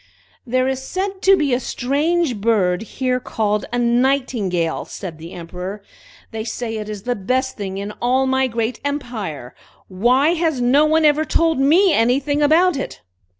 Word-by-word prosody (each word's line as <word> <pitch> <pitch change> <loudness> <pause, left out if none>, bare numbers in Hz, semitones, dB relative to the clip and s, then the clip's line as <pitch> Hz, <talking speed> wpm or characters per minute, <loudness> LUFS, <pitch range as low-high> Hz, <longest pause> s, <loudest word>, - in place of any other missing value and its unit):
"There 255 +2 +1
is 265 0 -2
said 380 +6 -4
to 390 0 +5
be 290 -6 +1
a 245 - +2
strange 285 +3 0
bird 200 -4 +1
here 255 +2 -2
called 210 -3 -1
a 245 - -1
Nightingale!" 235 -8 0
said 170 -5 -8
the 165 +2 -9
Emperor. 180 +4 -7 0.5
"They 220 -1 -4
say 225 -1 -4
it 215 0 -6
is 210 -2 -6
the 245 0 -1
best 255 +6 -1
thing 195 -2 -5
in 200 +1 -4
all 255 +2 +2
my 265 0 +1
great 230 0 -2
empire. 225 - -4 0.4
Why 245 +10 +3
has 325 -5 0
no 260 +5 +4
one 315 0 +3
ever 300 +1 +4
told 325 -1 +1
me 330 +7 +4
anything 275 +5 +1
about 320 +3 +4
it?" 270 - -6
250 Hz, 165 wpm, -20 LUFS, 210-285 Hz, 0.5 s, to